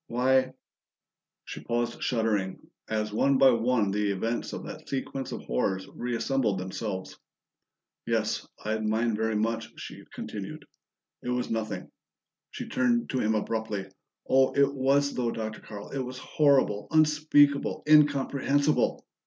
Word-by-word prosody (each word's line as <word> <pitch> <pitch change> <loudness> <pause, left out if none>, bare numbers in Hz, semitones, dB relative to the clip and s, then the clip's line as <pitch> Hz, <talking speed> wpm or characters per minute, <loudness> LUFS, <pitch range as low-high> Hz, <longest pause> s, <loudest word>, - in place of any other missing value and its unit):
"Why 130 +2 +2 0.4
". - - -63
She - - -8
paused 120 0 -2
shuddering, 110 -6 0 0.3
as 105 -1 -1
one 135 +5 +3
by 135 0 +7
one 115 -3 +1
the 105 0 0
events 115 +5 -2
of - - -6
that - - -9
sequence 135 0 -3
of - - -6
horrors 95 +10 -1
reassembled 120 -2 0
themselves. 95 +1 -5 0.9
"Yes, - - 0 0.2
I'd 110 0 -1
mind 110 +1 +1
very 110 0 0
much," 115 +1 -1
she - - -9
continued. - - -7 0.6
"It - - -5
was 125 -1 -1
nothing 110 -1 -3 0.3
" - - -63
She - - -5
turned 120 -2 +1
to 130 - 0
him 110 -1 +1
abruptly. 110 -2 -2 0.4
"Oh, 130 0 +4
it 140 0 +3
was, 140 +1 +2
though, 120 -2 0
Dr. 110 -1 -4
Carl! 105 -1 -9
It 140 - -3
was 130 0 -6
horrible, 130 -7 +2
unspeakable, 150 -2 +3
incomprehensible! 145 -1 +3
120 Hz, 140 wpm, -28 LUFS, 110-135 Hz, 0.9 s, by